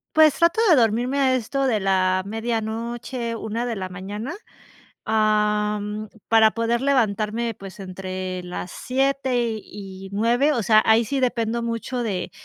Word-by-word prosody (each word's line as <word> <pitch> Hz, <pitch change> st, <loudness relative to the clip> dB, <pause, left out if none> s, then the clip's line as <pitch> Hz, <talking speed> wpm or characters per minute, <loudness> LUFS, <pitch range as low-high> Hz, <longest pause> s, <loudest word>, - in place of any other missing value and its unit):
Pues, 310 Hz, -2 st, +6 dB
trato 340 Hz, +6 st, +3 dB
de 335 Hz, -, +7 dB
dormirme 240 Hz, +2 st, +2 dB
a 265 Hz, -2 st, +3 dB
esto 255 Hz, +3 st, -1 dB
de 230 Hz, -5 st, +2 dB
la 185 Hz, -1 st, +2 dB
medianoche, 230 Hz, +2 st, -3 dB
1 225 Hz, +1 st, -3 dB
de 240 Hz, -2 st, -2 dB
la 190 Hz, -2 st, -4 dB
mañana, 205 Hz, -, -6 dB, 0.7 s
am, 210 Hz, -1 st, 0 dB, 0.2 s
para 220 Hz, -1 st, +6 dB
poder 230 Hz, +1 st, 0 dB
levantarme, 230 Hz, -3 st, 0 dB
pues, 195 Hz, 0 st, -10 dB
entre 185 Hz, 0 st, -5 dB
las 180 Hz, 0 st, -6 dB
7 270 Hz, 0 st, 0 dB, 0.3 s
y 195 Hz, -1 st, -10 dB
9, 240 Hz, +8 st, +2 dB
o 235 Hz, -5 st, -1 dB
sea, 215 Hz, +2 st, +5 dB
ahí 220 Hz, +1 st, +5 dB
sí, 275 Hz, +4 st, -2 dB
dependo 235 Hz, -2 st, 0 dB
mucho 235 Hz, +2 st, -3 dB
de 195 Hz, -5 st, -3 dB
225 Hz, 145 wpm, -23 LUFS, 205-245 Hz, 0.7 s, de